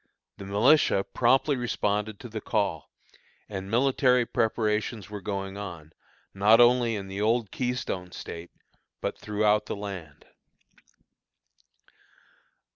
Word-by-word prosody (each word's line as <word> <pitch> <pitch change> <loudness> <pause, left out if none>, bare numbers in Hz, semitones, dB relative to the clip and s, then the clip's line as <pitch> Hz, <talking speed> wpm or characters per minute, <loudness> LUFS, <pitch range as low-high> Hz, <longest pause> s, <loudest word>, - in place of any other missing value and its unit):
The 100 - -8
militia 105 +1 +4
promptly 135 +6 +2
responded 105 -3 -1
to - - -7
the 110 -2 -6
call, 105 -2 -1 0.6
and 95 -2 -6
military 125 +1 +3
preparations 110 -2 -1
were 105 -1 -6
going 95 0 -4
on, 85 -6 -8 0.4
not 105 +4 +5
only 120 -1 +5
in 100 -2 -5
the 95 +1 -5
old 110 -1 +1
Keystone 125 -8 -3
State, 85 0 -8 0.5
but - - -4
throughout 105 0 +1
the - - -3
land. 95 -8 -8
105 Hz, 115 wpm, -27 LUFS, 100-120 Hz, 0.6 s, not